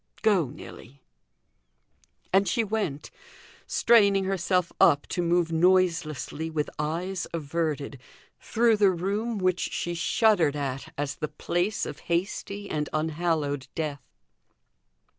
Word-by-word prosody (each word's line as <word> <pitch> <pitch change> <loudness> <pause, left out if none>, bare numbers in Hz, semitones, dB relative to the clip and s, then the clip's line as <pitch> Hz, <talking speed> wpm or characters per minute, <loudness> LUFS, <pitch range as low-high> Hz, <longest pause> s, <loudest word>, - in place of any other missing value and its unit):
Go, 200 -9 +3
Nelly." 135 -1 -12 1.3
And 195 +1 +4
she 235 - +1
went; 200 -9 -3 0.6
straining 200 -4 +4
herself 185 -1 0
up 145 - +5
to 175 - -1
move 170 -1 +1
noiselessly, 165 -3 +1
with 155 -2 -2
eyes 175 +5 -2
averted, 150 -3 -3 0.4
through 230 -1 +2
the 205 -2 +5
room 200 +6 -2
which 185 -2 +1
she 175 - -2
shuddered 170 -3 +2
at 140 +2 -4
as 140 -1 -3
the 150 - -2
place 175 +6 -1
of - - -7
hasty 200 +3 -2
and 150 -4 -2
unhallowed 155 -3 -1
death. 150 -3 -3
170 Hz, 115 wpm, -27 LUFS, 150-195 Hz, 1.3 s, up